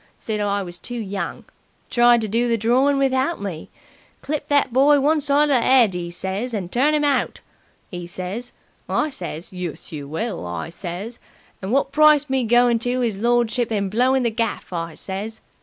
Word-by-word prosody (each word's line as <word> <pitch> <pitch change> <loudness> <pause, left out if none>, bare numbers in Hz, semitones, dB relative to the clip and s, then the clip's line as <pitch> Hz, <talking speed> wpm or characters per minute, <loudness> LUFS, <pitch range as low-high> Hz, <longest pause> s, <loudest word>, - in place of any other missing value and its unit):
Said 215 -2 -3
I 200 -1 0
was 175 -1 -8
too 245 - -6
young. 200 -3 -4 0.5
Tried 240 -1 +5
to 220 - -2
do 235 +4 0
the 230 - +2
drawin' 255 +6 +2
without 270 +4 +1
me. 185 -6 -6 0.5
'Clip 300 +1 -3
that 285 -4 +2
boy 285 +3 +5
one 300 +2 +2
side 290 +1 +3
of 255 -4 +4
the - - -1
'ead!' 250 -7 +5
'e 175 -1 -4
says, 190 +7 -3
'and 185 -4 -4
turn 290 +5 +2
'im 300 - +1
out!' 285 -1 0 0.5
'e 175 -2 -6
says. 185 +7 -5 0.4
I 305 - 0
says, 175 - -7
'Yus, 180 -4 -6
you 145 -3 -6
will!' 175 - -4
I 85 - -5
says. 190 +7 -7 0.4
'And 190 +2 -4
wot 275 +1 +1
price 300 -1 +5
me 265 -2 +1
goin' 240 0 +4
to 245 +2 -1
'is 215 -5 -1
lordship 240 +1 +1
and 200 -3 -1
blowing 255 +4 +2
the 235 - +1
gaff?' 225 -4 -3
I 165 -1 -4
says. 205 +3 -5
230 Hz, 190 wpm, -22 LUFS, 190-265 Hz, 0.5 s, Tried